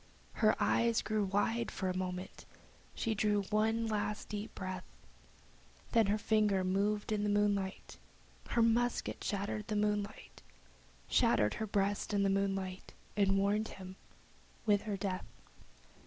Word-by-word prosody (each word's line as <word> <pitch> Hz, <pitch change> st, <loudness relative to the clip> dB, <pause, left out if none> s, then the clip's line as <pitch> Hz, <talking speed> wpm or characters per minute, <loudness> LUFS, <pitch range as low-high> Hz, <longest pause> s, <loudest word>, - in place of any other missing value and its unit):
Her 215 Hz, -1 st, +3 dB
eyes 230 Hz, -1 st, +2 dB
grew 215 Hz, -1 st, 0 dB
wide 205 Hz, +4 st, 0 dB
for 190 Hz, -, -3 dB
a 185 Hz, -, -1 dB
moment, 185 Hz, 0 st, -4 dB, 0.5 s
she 225 Hz, -, 0 dB
drew 210 Hz, -1 st, +1 dB
one 220 Hz, +2 st, +2 dB
last 210 Hz, -1 st, -2 dB
deep 210 Hz, +1 st, -5 dB
breath, 185 Hz, -1 st, -4 dB, 1.1 s
Then 225 Hz, -4 st, +4 dB
her 205 Hz, +2 st, +2 dB
finger 210 Hz, -3 st, +2 dB
moved 205 Hz, +3 st, 0 dB
in 210 Hz, -1 st, +1 dB
the 210 Hz, -, 0 dB
moonlight 205 Hz, -2 st, 0 dB, 0.5 s
Her 235 Hz, -, +3 dB
musket 235 Hz, +1 st, +1 dB
shattered 205 Hz, +1 st, -2 dB
the 215 Hz, -, -2 dB
moonlight 210 Hz, 0 st, -2 dB, 0.7 s
Shattered 115 Hz, -, +3 dB
her 220 Hz, -, -3 dB
breast 205 Hz, +1 st, 0 dB
in 200 Hz, -, +3 dB
the 195 Hz, -, +3 dB
moonlight 195 Hz, -1 st, -2 dB, 0.2 s
and 195 Hz, -1 st, +3 dB
warned 205 Hz, +2 st, +1 dB
him 185 Hz, -1 st, -9 dB, 0.7 s
with 205 Hz, -2 st, +4 dB
her 200 Hz, -, -1 dB
death. 190 Hz, -2 st, -3 dB
205 Hz, 140 wpm, -34 LUFS, 195-215 Hz, 1.1 s, Then